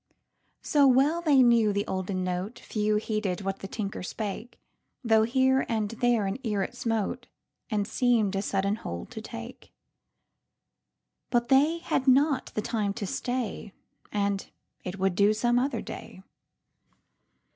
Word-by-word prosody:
So 285 -2 +4
well 275 +6 +4
they 285 -6 +5
knew 235 -3 +4
the 200 0 -1
olden 185 0 -2
noteFew 210 +3 -1
heeded 215 -4 -2
what 195 0 -3
the 195 - -6
tinker 200 0 -4
spake, 210 +5 -5 0.4
Though 225 -2 +4
here 260 +3 +3
and 220 -3 0
there 235 -2 +1
an 195 +6 -3
ear 210 -6 -1
it - - -4
smoteAnd 225 -2 -4
seem'd 225 -4 +1
a 195 - 0
sudden 200 +1 0
hold 85 - -7
to 220 - -7
take; 230 +2 -9 1.6
But 240 -1 +1
they 290 +5 +4
had 280 -5 -2
not 270 +1 +4
the 215 - -1
time 210 -4 -1
to 205 - -3
stay, 235 -1 -3 0.4
And 200 -1 -1 0.3
it 185 +1 -5
would 190 -1 +1
do 200 +3 +4
some 240 +3 +2
other 255 -2 -1
day. 185 - -9
220 Hz, 140 wpm, -27 LUFS, 200-245 Hz, 1.6 s, they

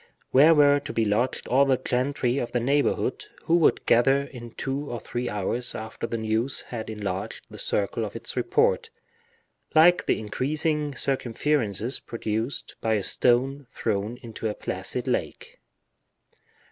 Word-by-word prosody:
Where 150 +5 +7
were 145 -1 +5
to - - -7
be 115 - +1
lodged 110 +5 0
all 135 +2 +4
the 135 -2 +3
gentry 125 +1 0
of 120 - -4
the 120 - +2
neighborhood, 140 +4 0 0.2
who 165 - +2
would 165 - +3
gather 135 +4 +4
in 120 -4 -9
two 135 +5 -4
or 120 - -4
three 120 +3 -4
hours 110 +5 -2
after 110 +1 -5
the 115 - -3
news 110 +4 -1
had 115 -3 -5
enlarged 100 -3 -4
the - - -9
circle - - -1
of - - -5
its - - -4
report, 475 +1 +1 0.9
like 175 +3 +6
the - - +2
increasing 150 +6 -1
circumferences 125 -3 0
produced 115 0 -4
by 110 -1 +1
a 105 - -1
stone 130 +5 +2
thrown 110 +2 -2
into 115 -1 -4
a 105 - -4
placid - - -3
lake? - - -3
125 Hz, 150 wpm, -26 LUFS, 110-145 Hz, 0.9 s, Where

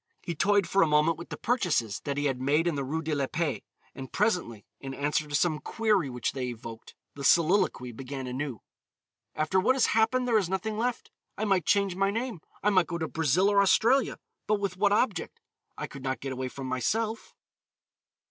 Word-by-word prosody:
He 170 - -3
toyed 200 +3 +2
for 195 - +2
a 165 - +5
moment 150 +2 +3
with 170 - -9
the - - -6
purchases 175 - 0
that 140 -1 -2
he 145 - 0
had 130 -3 -1
made 145 +5 +2
in 170 - +1
the 140 -1 -2
Rue 160 +5 -3
de 155 0 -2
la 140 -2 0
Paix, 150 -9 -2 0.3
and 135 -1 -8
presently, 180 - 0
in 135 -1 -6
answer 150 +2 0
to 145 - -3
some 155 -1 +2
query 210 -9 0
which 125 -1 -2
they 130 -2 -3
evoked, 115 -1 -9 0.2
the 140 - -8
soliloquy 170 -6 +3
began 130 +2 -6
anew. 130 -2 -4 0.7
"After 155 +5 +1
what 255 +8 +3
has 265 - +3
happened 250 +3 +2
there 225 -3 +4
is 185 -4 -2
nothing 210 +3 -2
left. 240 +2 -2 0.3
I 215 - -1
might 190 -6 +1
change 200 -2 +2
my 195 +1 +2
name. 225 -3 -3 0.2
I 210 - +3
might 185 -4 +3
go 170 - -3
to 160 -1 -2
Brazil 160 +5 +2
or 200 -1 +4
Australia, 235 +7 +3 0.3
but 210 0 +2
with 200 -2 -2
what 200 +2 +2
object? 205 -3 0 0.4
I - - -3
could 135 - -10
not 130 0 -2
get 135 - -5
away 130 0 -3
from 135 +1 -7
myself. 215 - -2
165 Hz, 205 wpm, -28 LUFS, 135-200 Hz, 0.7 s, a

